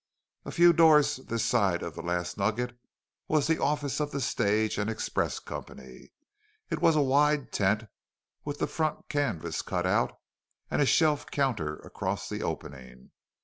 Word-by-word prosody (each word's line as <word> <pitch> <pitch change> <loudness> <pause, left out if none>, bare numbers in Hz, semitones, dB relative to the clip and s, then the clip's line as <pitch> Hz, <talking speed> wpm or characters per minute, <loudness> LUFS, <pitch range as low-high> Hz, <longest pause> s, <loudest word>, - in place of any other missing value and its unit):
A - - -5
few 175 0 +6
doors 155 -4 +5
this 115 -3 -3
side 100 -7 +2
of 85 - -5
the - - -7
Last 90 +1 -2
Nugget 110 +5 -1 0.5
was 155 -2 +2
the 160 0 +1
office 145 -1 0
of 150 -1 -1
the 140 - -4
stage 110 -4 0
and 105 +2 -1
express 110 - -2
company. 65 -1 -10 0.6
It - - -2
was 165 - +5
a 150 - +4
wide 145 +1 +2
tent 105 +2 +1 0.6
with 145 -1 -4
the - - 0
front 155 -2 -3
canvas 145 - -1
cut - - -2
out - - +1 0.5
and - - +1
a 140 - +3
shelf 155 -2 +3
counter 115 - -1
across - - -4
the - - -4
opening. 65 -2 -7
125 Hz, 160 wpm, -28 LUFS, 100-150 Hz, 0.6 s, few